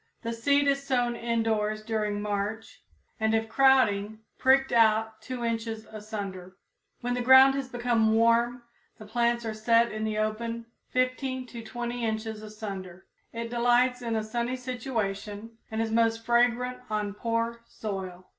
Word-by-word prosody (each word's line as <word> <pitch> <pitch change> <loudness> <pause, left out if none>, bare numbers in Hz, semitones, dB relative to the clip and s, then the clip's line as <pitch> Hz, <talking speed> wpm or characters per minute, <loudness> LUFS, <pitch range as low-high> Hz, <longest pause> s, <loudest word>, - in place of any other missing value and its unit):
The 230 0 -2
seed 280 +5 +2
is 275 0 +2
sown 245 -3 0
indoors 225 -2 -1
during 210 -2 -2
March, 210 +2 -3 0.4
and 220 0 +2
if 225 0 0
crowding, 220 -5 +3 0.2
pricked 270 +1 +4
out 220 -1 +3
2 255 -2 -5
inches 225 -1 -3
asunder. 200 -4 -7 0.4
When 245 0 -1
the 245 - -1
ground 260 +2 +8
has 270 -1 -3
become 240 -3 +2
warm, 235 +2 +3 0.3
the 215 - -11
plants 235 +2 0
are 220 - -2
set 230 +2 +3
in 215 0 -4
the 215 -1 -1
open 230 +2 -2 0.2
15 255 0 -1
to 235 -2 -8
20 240 +1 -4
inches 220 -1 -3
asunder. 195 -4 -8 0.3
It 230 0 -5
delights 245 +1 +3
in 230 -2 -2
a 220 - 0
sunny 235 +3 -2
situation, 225 -4 -4
and 220 - -3
is 220 - -3
most 225 0 +1
fragrant 245 +1 +2
on 210 -1 -2
poor 230 +2 -2
soil. 190 -4 -6
230 Hz, 150 wpm, -28 LUFS, 215-245 Hz, 0.4 s, ground